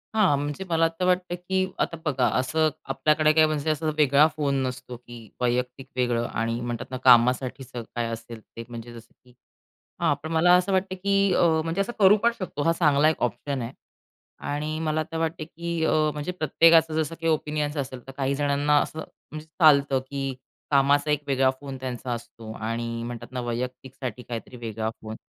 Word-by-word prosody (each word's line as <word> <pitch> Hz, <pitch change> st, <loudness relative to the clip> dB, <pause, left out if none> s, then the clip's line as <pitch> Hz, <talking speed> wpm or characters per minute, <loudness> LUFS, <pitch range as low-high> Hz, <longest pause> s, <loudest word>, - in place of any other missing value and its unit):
हां, 185 Hz, -10 st, +4 dB
म्हणजे 145 Hz, +5 st, -4 dB
मला 165 Hz, 0 st, +3 dB
तर 180 Hz, -, +1 dB
वाटतं, 180 Hz, -1 st, +1 dB
की 185 Hz, +1 st, -1 dB
आता 165 Hz, -, -1 dB
बघा, 130 Hz, -5 st, +2 dB
असं 155 Hz, +5 st, +1 dB, 0.2 s
आपल्याकडे 155 Hz, +2 st, +3 dB
काय 155 Hz, 0 st, +6 dB
म्हणजे 155 Hz, 0 st, -1 dB
असा 155 Hz, +1 st, 0 dB
वेगळा 145 Hz, 0 st, +5 dB
फोन 140 Hz, -2 st, 0 dB
नसतो, 125 Hz, -1 st, -6 dB
की 120 Hz, -3 st, -13 dB
वैयक्तिक 125 Hz, +2 st, -1 dB
वेगळं 120 Hz, -2 st, 0 dB
आणि 115 Hz, +1 st, -2 dB
म्हणतात 120 Hz, 0 st, -4 dB
ना 130 Hz, -, -3 dB
कामासाठीचं 125 Hz, 0 st, +3 dB
स -, -, -18 dB
काय 120 Hz, -1 st, -1 dB
असेल 115 Hz, 0 st, -7 dB
ते. 115 Hz, -, -10 dB
म्हणजे 120 Hz, 0 st, -8 dB
जसं 115 Hz, 0 st, -13 dB
की 125 Hz, -1 st, -21 dB, 0.7 s
हां, 145 Hz, -, +3 dB
पण 160 Hz, +1 st, -5 dB
मला 170 Hz, +2 st, +5 dB
असं 180 Hz, +2 st, 0 dB
वाटतं 190 Hz, 0 st, 0 dB
की 200 Hz, -1 st, +2 dB
अ, -, -, +3 dB, 0.2 s
म्हणजे 165 Hz, +4 st, -2 dB
असं 240 Hz, +5 st, -1 dB
करू 200 Hz, +1 st, +7 dB
पण 235 Hz, 0 st, +4 dB
शकतो. 180 Hz, -6 st, -4 dB
हा 165 Hz, -, +3 dB
चांगला 150 Hz, -2 st, +4 dB
एक 160 Hz, -, -1 dB
ऑप्शन 130 Hz, +1 st, -2 dB
आहे 115 Hz, +3 st, -5 dB, 0.8 s
आणि 155 Hz, +2 st, -3 dB
मला 155 Hz, 0 st, 0 dB
तर 165 Hz, -, -3 dB
वाटते 165 Hz, 0 st, -2 dB
की 170 Hz, 0 st, -4 dB
अ, -, -, +2 dB, 0.2 s
म्हणजे 150 Hz, +4 st, -4 dB
प्रत्येकाचं 165 Hz, -1 st, +4 dB
जसं 155 Hz, +2 st, -4 dB
काही 165 Hz, -1 st, +2 dB
ओपिनियन्स 150 Hz, 0 st, -2 dB
असेल 130 Hz, -3 st, -5 dB
तर -, -, -7 dB
काही 135 Hz, 0 st, 0 dB
जणांना 145 Hz, +1 st, +2 dB
असं 160 Hz, -, -5 dB
म्हणजे 155 Hz, 0 st, -10 dB
चालतं 145 Hz, -4 st, +4 dB
की 135 Hz, -1 st, -3 dB, 0.4 s
कामाचा 145 Hz, +2 st, +3 dB
एक 150 Hz, 0 st, +1 dB
वेगळा 135 Hz, -1 st, +3 dB
फोन 135 Hz, -2 st, -7 dB
त्यांचा 125 Hz, -1 st, -5 dB
असतो 115 Hz, -1 st, -7 dB
आणि 115 Hz, +1 st, -3 dB
म्हणतात 120 Hz, +1 st, -7 dB
ना 125 Hz, -1 st, -3 dB
वैयक्तिकसाठी 125 Hz, 0 st, -5 dB
काहीतरी 120 Hz, +1 st, -7 dB
वेगळा 110 Hz, -1 st, -3 dB
फोन. 110 Hz, 0 st, -7 dB
140 Hz, 185 wpm, -25 LUFS, 125-160 Hz, 0.8 s, करू